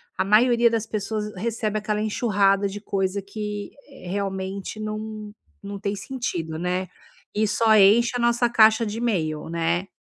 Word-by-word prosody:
a -, -, +1 dB
maioria 235 Hz, +4 st, +4 dB
das 225 Hz, -1 st, -1 dB
pessoas 210 Hz, 0 st, -3 dB
recebe 215 Hz, +1 st, -2 dB
aquela 210 Hz, 0 st, -2 dB
enxurrada 205 Hz, -2 st, +2 dB
de 200 Hz, +1 st, -6 dB
coisa 195 Hz, -1 st, -1 dB
que, 205 Hz, +1 st, -6 dB, 0.2 s
eh, 270 Hz, -9 st, -12 dB
realmente 195 Hz, +1 st, -4 dB
não 215 Hz, 0 st, -6 dB, 0.3 s
não 200 Hz, 0 st, -6 dB
tem 200 Hz, +1 st, -2 dB
sentido, 180 Hz, -9 st, -4 dB
né. 180 Hz, +1 st, -1 dB, 0.5 s
E 215 Hz, 0 st, +1 dB
só 220 Hz, +1 st, +3 dB
enche 215 Hz, +5 st, +5 dB
a 245 Hz, -, -1 dB
nossa 235 Hz, 0 st, +2 dB
caixa 225 Hz, 0 st, +5 dB
de 210 Hz, +1 st, -4 dB
email 160 Hz, -11 st, -1 dB
né. 170 Hz, +2 st, -1 dB
210 Hz, 155 wpm, -24 LUFS, 195-220 Hz, 0.5 s, enche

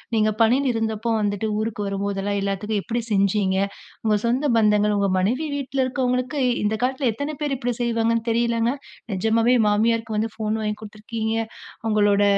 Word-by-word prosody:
நீங்க 215 Hz, -1 st, +3 dB
பணியில் 255 Hz, +4 st, +4 dB
இருந்தப்போ 225 Hz, 0 st, -2 dB
வந்துட்டு 205 Hz, +1 st, -1 dB
ஊருக்கு 215 Hz, -1 st, -2 dB
வரும்போதெல்லாம், 200 Hz, 0 st, -2 dB
எல்லாத்துக்கும் 200 Hz, +2 st, -1 dB
எப்பிடி 240 Hz, 0 st, -2 dB
செஞ்சீங்க? 195 Hz, -1 st, +2 dB, 0.5 s
உங்க 215 Hz, -2 st, +3 dB
சொந்த 260 Hz, +5 st, +1 dB
பந்தங்கள், 210 Hz, -1 st, +3 dB
உங்க 200 Hz, -1 st, +2 dB
மனைவி 255 Hz, +12 st, 0 dB
வீட்ல 275 Hz, -1 st, -3 dB
இருக்கவங்களுக்கு 255 Hz, +2 st, -1 dB, 0.2 s
இந்த 210 Hz, +1 st, +1 dB
காலத்ல 260 Hz, 0 st, +1 dB
எத்தன 285 Hz, +6 st, -4 dB
பேரு 285 Hz, -2 st, 0 dB
இப்பிடி 245 Hz, -1 st, -1 dB
செய்வாங்கன்னு 230 Hz, -1 st, +1 dB
தெரியலங்க! 235 Hz, 0 st, +1 dB, 0.4 s
நெஜமாவே 225 Hz, +5 st, +3 dB
மாமியாருக்கு 220 Hz, +1 st, +1 dB
வந்து 220 Hz, 0 st, -1 dB
ஃபோன் 220 Hz, 0 st, -1 dB
வாங்கி 210 Hz, 0 st, -2 dB
குடுத்துருக்கீங்க. 220 Hz, +1 st, -4 dB, 0.5 s
உங்களோட 205 Hz, -1 st, +3 dB
220 Hz, 145 wpm, -23 LUFS, 210-240 Hz, 0.5 s, பணியில்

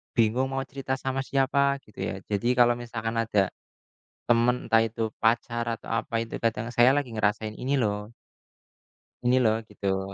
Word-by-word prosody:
Bingung 120 Hz, +3 st, +2 dB
mau 135 Hz, 0 st, -1 dB
cerita 135 Hz, 0 st, -4 dB
sama 135 Hz, 0 st, -3 dB
siapa, 140 Hz, +1 st, +2 dB
gitu 105 Hz, -, -17 dB
ya. -, -, -2 dB
Jadi 105 Hz, +3 st, 0 dB
kalau 120 Hz, -1 st, +6 dB
misalkan 115 Hz, -1 st, -4 dB
ada, 105 Hz, -4 st, +1 dB, 0.8 s
teman 120 Hz, +1 st, +3 dB
entah 115 Hz, 0 st, +5 dB
itu 115 Hz, 0 st, -2 dB
pacar 115 Hz, +1 st, +1 dB
atau -, -, -15 dB
apa, -, -, -12 dB
itu 115 Hz, -, -7 dB
kadang 115 Hz, 0 st, 0 dB
saya 120 Hz, +2 st, +6 dB
lagi 140 Hz, -4 st, -1 dB
ngerasain 110 Hz, 0 st, 0 dB
ini 135 Hz, +3 st, -1 dB
loh 105 Hz, 0 st, -2 dB, 1.1 s
ini 125 Hz, +1 st, +4 dB
loh, 110 Hz, -2 st, +3 dB
gitu. 95 Hz, -2 st, -3 dB
115 Hz, 160 wpm, -27 LUFS, 110-125 Hz, 1.1 s, kalau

